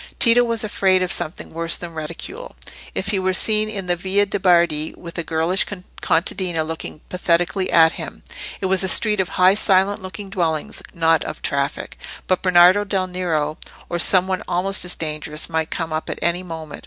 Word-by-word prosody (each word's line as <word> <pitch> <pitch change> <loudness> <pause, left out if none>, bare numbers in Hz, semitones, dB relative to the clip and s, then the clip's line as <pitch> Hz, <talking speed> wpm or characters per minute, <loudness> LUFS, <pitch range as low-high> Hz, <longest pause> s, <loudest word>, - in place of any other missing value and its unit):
Tito 240 0 +5
was 230 -2 -2
afraid 190 -3 +1
of 180 - -2
something 155 - -2
worse 165 0 +1
than 170 -1 -8
ridicule, 155 +1 -7 0.4
if 195 - -3
he 200 -2 0
were 185 0 0
seen 215 +2 +2
in 195 -3 -5
the 175 -1 0
Via 190 +3 0
de' 205 0 -3
Bardi 170 -4 +2
with 170 -1 -10
a - - -2
girlish 165 +4 +1 0.4
contadina 170 0 0
looking 160 -1 -7
pathetically 180 +1 0
at 160 -1 +6
him. - - -8 0.4
It - - -2
was 190 0 +1
a - - 0
street 210 +2 +2
of 190 - 0
high 185 +1 +4
silent 195 -1 +3
looking 190 +1 -8
dwellings, 170 +1 -2
not 165 -2 +2
of - - -8
traffic; 140 +1 -3 0.3
but 185 - 0
Bernardo 185 +2 +5
del 195 -2 -1
Nero, 170 -4 -2 0.3
or 175 - -2
some 185 +2 +5
one 190 -1 -2
almost 185 +3 +2
as 180 - +1
dangerous, 155 -1 -3
might 160 -1 -2
come 165 -2 -4
up 155 - -3
at - - -4
any 170 +1 0
moment. 160 -4 -8
180 Hz, 190 wpm, -20 LUFS, 165-190 Hz, 0.4 s, at